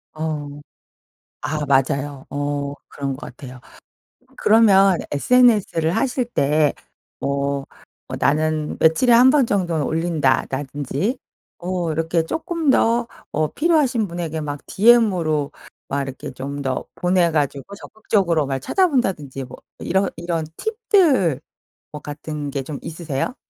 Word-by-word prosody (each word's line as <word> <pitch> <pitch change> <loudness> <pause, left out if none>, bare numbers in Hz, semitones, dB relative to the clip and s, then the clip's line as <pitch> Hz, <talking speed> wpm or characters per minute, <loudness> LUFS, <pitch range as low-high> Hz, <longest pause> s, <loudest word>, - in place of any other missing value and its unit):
어. 155 -2 -3 0.9
아 150 0 -2
맞아요 140 0 0
어. 145 0 -3
그런 140 -1 -4
것 130 - -11 0.2
같아요. 130 -3 -10 0.8
그러면 195 -4 +5
sns를 205 - +3
하실 255 -1 0
때 150 -8 +1 0.5
어 140 0 -1 0.4
뭐 - - -5
'나는 155 +1 0
며칠에 165 +10 +4
1 245 +3 +7
번 275 -5 +3
정도는 175 -6 0
올린다.'라든지 145 - -1 0.4
어 175 -2 -2
이렇게 165 +1 0
조금 325 - -2
더 235 -2 +3 0.2
어 155 +1 0
필요하신 280 - +1
분에게 170 -2 -4
막 145 -1 -5
디엠으로 185 -10 +3 0.4
막 140 0 -1
이렇게 135 -1 -7
좀 140 +2 -6
더 130 -2 -2
보내 180 -1 +2
가지고 145 +3 -2
적극적으로 195 -7 0
날 135 -1 -2
찾아본다든지 190 - 0
뭐 125 - -11 0.2
이런 190 +2 0
이런 170 -1 -2
팁들 365 - +2 0.5
뭐 150 - -7
같은 150 0 -6
게 140 -1 -2
좀 145 +2 -6
있으세요? 160 - -4
160 Hz, 250 characters per minute, -21 LUFS, 145-210 Hz, 0.9 s, 1